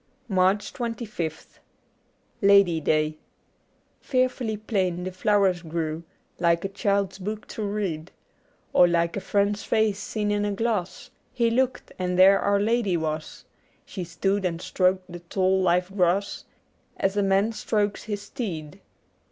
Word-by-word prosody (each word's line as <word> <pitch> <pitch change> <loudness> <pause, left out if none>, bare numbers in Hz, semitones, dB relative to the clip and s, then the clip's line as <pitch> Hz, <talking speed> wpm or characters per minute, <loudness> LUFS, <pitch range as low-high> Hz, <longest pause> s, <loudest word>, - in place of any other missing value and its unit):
90 - - -4
MARCH 190 +3 +2
25th 220 - -5 0.8
LADY 200 -5 +5
DAY 155 0 +1 0.8
FEARFULLY 255 -4 0
plain 190 -5 -1
the 185 - -4
flowers 190 -1 +2
grew, 160 -1 -3 0.4
Like 170 +1 +2
a - - -1
child's 200 -1 -1
book 210 +3 -5
to - - -6
read, 200 -6 -3 0.6
Or 175 - +7
like 170 -1 +1
a - - -1
friend's 205 +1 0
face 220 -3 +1
seen 210 0 -2
in 205 0 0
a 205 0 -1
glass. 210 -4 -2 0.2
He 235 -2 +1
looked, 255 +1 0
and 180 0 -1
there 195 +2 +7
Our 200 0 +2
Lady 210 -3 +1
was; 155 -1 -4 0.4
She 185 - -6
stood 195 +4 -1
and 170 -2 -1
stroked 185 +1 +1
the 175 - -7
tall 190 +2 +1
live 180 +1 +1
grass 190 +1 +1 0.5
As 195 +1 0
a 205 - +2
man 195 +2 +2
strokes 210 -2 -1
his 205 -1 -4
steed. 160 - -6
195 Hz, 145 wpm, -25 LUFS, 175-210 Hz, 0.8 s, Or